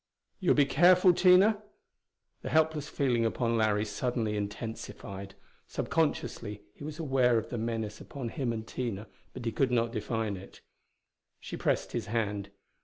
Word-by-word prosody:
"You'll 185 - +3
be 145 - +5
careful, 180 +5 +6
Tina?" 190 +4 +5 0.8
The - - -5
helpless 155 -1 +2
feeling 125 -5 +1
upon 115 +1 0
Larry 110 -1 +2
suddenly 110 0 -1
intensified. 100 -2 -6 0.3
Subconsciously 115 -9 -1
he - - -12
was 155 +1 -6
aware 130 -6 +3
of 110 - -2
the 120 - -2
menace 110 -2 -3
upon 130 -5 -6
him 130 -2 -2
and 110 -1 -4
Tina, 115 -4 -4 0.3
but 125 -2 -7
he 115 - 0
could 130 +4 +1
not 115 -2 +1
define 110 -2 -2
it. 95 - -13 0.8
She - - -7
pressed - - 0
his 115 -3 -3
hand. 105 -3 -1
115 Hz, 150 wpm, -30 LUFS, 110-145 Hz, 0.8 s, careful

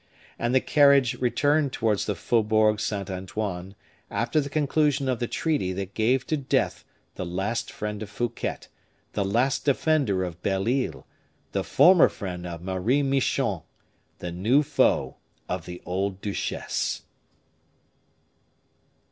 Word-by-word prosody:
And 120 +2 0
the - - +7
carriage 140 -4 +5
returned 145 +3 +2
towards 110 -3 0
the 105 - 0
Faubourg 110 +1 +2
Saint 100 -3 -3
Antoine, 95 0 -4 0.3
after 120 +8 +1
the 140 - -5
conclusion 145 -1 +1
of 130 -2 0
the 120 - -1
treaty 145 - -1
that 95 +1 -5
gave 125 +4 +1
to 155 - 0
death 140 -3 0 0.3
the - - -5
last 95 +6 -2
friend 105 0 -5
of 105 - -6
Fouquet, 120 +2 -3 0.5
the 100 - 0
last 120 +8 +1
defender 140 -9 +2
of 85 -2 -6
Belle 95 +1 0
Isle, 120 - -1 0.5
the - - -1
former 180 -1 +6
friend 90 -4 -6
of 85 -1 -7
Marie 95 +10 +1
Michon, 135 -1 +1 0.6
the 90 - -5
new 110 - +3
foe - - +1 0.3
of 90 -2 -4
the 90 0 -8
old 95 +1 -2
duchesse. 100 0 -2
110 Hz, 135 wpm, -26 LUFS, 95-135 Hz, 0.6 s, the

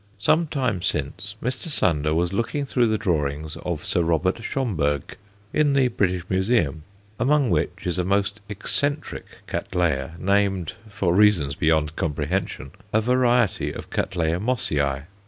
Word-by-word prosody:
Some 155 +11 +2
time 125 - -1
since, 100 +3 -2
Mr. 130 +7 -2
Sander 80 - +1
was 85 +3 +1
looking 115 +7 -1
through 125 -3 +2
the 110 -1 +1
drawings 80 -6 -1
of 85 -4 -4
Sir 90 - +1
Robert 85 +5 +1
Schomburgk, 80 - -1 0.3
in 150 -2 +3
the 135 -2 +3
British 90 -6 0
Museum, 95 - +1 0.4
among 140 -3 +3
which - - -1
is 90 0 0
a - - +2
most 100 +2 0
eccentric 145 +8 -2
Cattleya 80 -4 -1
named 95 -2 +1 0.2
for 100 -4 0
reasons 95 -8 +4
beyond 80 0 +1
comprehension 75 -1 -2 0.2
a 110 - +3
variety 120 - +2
of - - -7
C. - - 0
Mossiæ. 80 - 0
95 Hz, 135 wpm, -24 LUFS, 80-115 Hz, 0.4 s, reasons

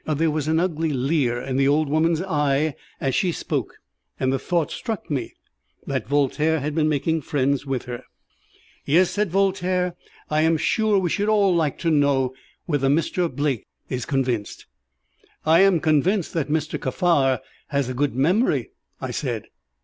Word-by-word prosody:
There 155 +1 +1
was 150 -1 -2
an 160 +1 +2
ugly 165 -2 0
leer 130 -2 +1
in 130 +1 -3
the 135 0 +3
old 150 +2 +3
woman's 160 +3 +1
eye 150 -4 +1 0.3
as 135 -1 -1
she 185 -3 +2
spoke, - - -3 0.4
and 130 0 +1
the 135 - 0
thought 170 0 -1
struck 220 -9 -5
me 130 -5 -3 0.5
that - - -3
Voltaire 145 +3 +1
had 145 +2 -3
been 155 0 +2
making 160 +2 0
friends 140 0 0
with 135 -3 -2
her. 125 0 -7 0.8
"Yes," 175 +5 +3
said 210 -1 0
Voltaire; 185 -1 +1 0.3
"I 155 0 +1
am 160 0 +3
sure 215 +6 +2
we 180 -4 0
should 205 +1 0
all 205 -3 +4
like 160 -4 0
to 165 - +1
know 140 -3 +2 0.3
whether 145 -5 +1
Mr. 165 +3 +1
Blake 140 -3 -2 0.2
is 125 -2 -3
convinced." 125 -6 -2 0.8
"I 160 +2 +5
am 195 -3 +5
convinced 160 +5 +1
that 160 -3 -1
Mr. 155 0 -1
Kaffar 135 - +2 0.3
has 140 -3 0
a 130 - -3
good 140 0 0
memory," 180 - +1 0.3
I - - -4
said. - - -3
155 Hz, 165 wpm, -23 LUFS, 135-170 Hz, 0.8 s, I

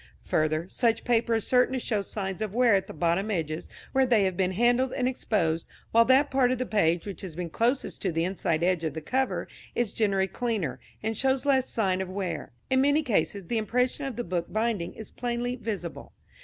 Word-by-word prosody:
Further, 155 +2 0
such 230 +2 +1
paper 235 -1 +2
is 225 - 0
certain 250 0 +3
to 260 - 0
show 215 -4 0
signs 195 -1 -5
of 215 -1 -3
wear 245 -2 +5
at 195 -1 +2
the - - -7
bottom 170 +6 0
edges 165 -4 -2 0.2
where 265 0 +3
they 230 -5 +4
have 190 -2 0
been 185 0 +1
handled 245 +5 +3
and 250 - 0
exposed, 170 -10 0 0.2
while 230 +1 +6
that 265 +4 +4
part 260 -2 +3
of 255 - 0
the 255 - -2
page 170 -7 +1
which 200 -2 -6
has 185 -6 -7
been 175 -1 -4
closest 245 - 0
to 190 - 0
the 165 0 0
inside 175 -3 -1
edge 180 -2 +2
of 155 -3 -2
the 160 - -4
cover 260 - -1 0.3
is 240 -4 0
generally 195 -3 +2
cleaner, 190 - -2 0.2
and 220 +1 -1
shows 265 +3 +1
less 265 -2 +3
sign 190 -4 +1
of 190 - -4
wear. 185 -2 -4 0.2
In 260 0 +4
many 285 +3 +3
cases 200 -5 0
the 230 +5 0
impression 250 +6 0
of 270 -4 -4
the 240 - -3
book 175 -3 -3
binding 215 -5 -1
is 220 - -9
plainly 245 0 -2
visible. 205 -8 -5
215 Hz, 215 wpm, -27 LUFS, 180-245 Hz, 0.3 s, while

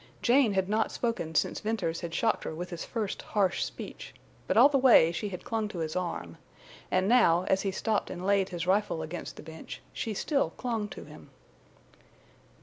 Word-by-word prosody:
Jane 245 -3 +4
had 190 -1 +1
not 215 +2 +1
spoken 200 -10 -2
since - - +1
Venters 200 -7 -2
had 170 - -5
shocked 225 -1 +1
her 160 - -4
with 175 +3 -6
his 170 -1 -5
first 215 -4 -3
harsh 200 -3 0
speech; - - -8 0.3
but - - +1
all 250 +4 +9
the 285 -2 +2
way 245 -11 +6
she 205 +5 -3
had 180 -2 -7
clung 225 -2 -1
to 210 -3 -8
his 160 -2 -3
arm, 170 - -4 0.5
and 185 +1 +2
now, 190 -8 +5
as 190 +1 +1
he 195 - -1
stopped 210 +2 -1
and 180 0 -6
laid 195 -1 +2
his 175 -2 -4
rifle 190 -3 +1
against 160 +3 -6
the - - -11
bench, 160 0 -9
she 220 -2 -3
still 280 +6 0
clung 230 -4 -2
to - - -9
him. - - -14
195 Hz, 195 wpm, -29 LUFS, 175-225 Hz, 0.5 s, all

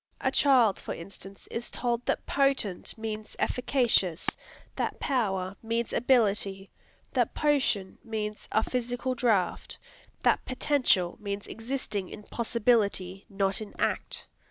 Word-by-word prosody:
A - - +1
child, 250 -8 +5
for - - -5
instance, 195 +2 -9
is 235 +1 -3
told 240 -1 -1
that - - 0
"potent" 275 -11 +1
means 215 -1 -5
"efficacious," 240 - +1 0.5
that - - -2
"power" 195 -8 0
means 230 0 -1
"ability," 205 -6 +2 0.4
that - - +1
"potion" 270 -10 +1
means 215 -1 -4
a 220 - +3
"physical 245 +1 -1
draught," 220 -8 +1 0.5
that - - +4
"potential" 255 -9 +2
means 200 -1 -3
"existing 225 -5 -3
in 210 - -9
possibility, 210 -5 +1
not 195 0 0
in 215 - -8
act." - - -1
220 Hz, 120 wpm, -29 LUFS, 195-245 Hz, 0.5 s, child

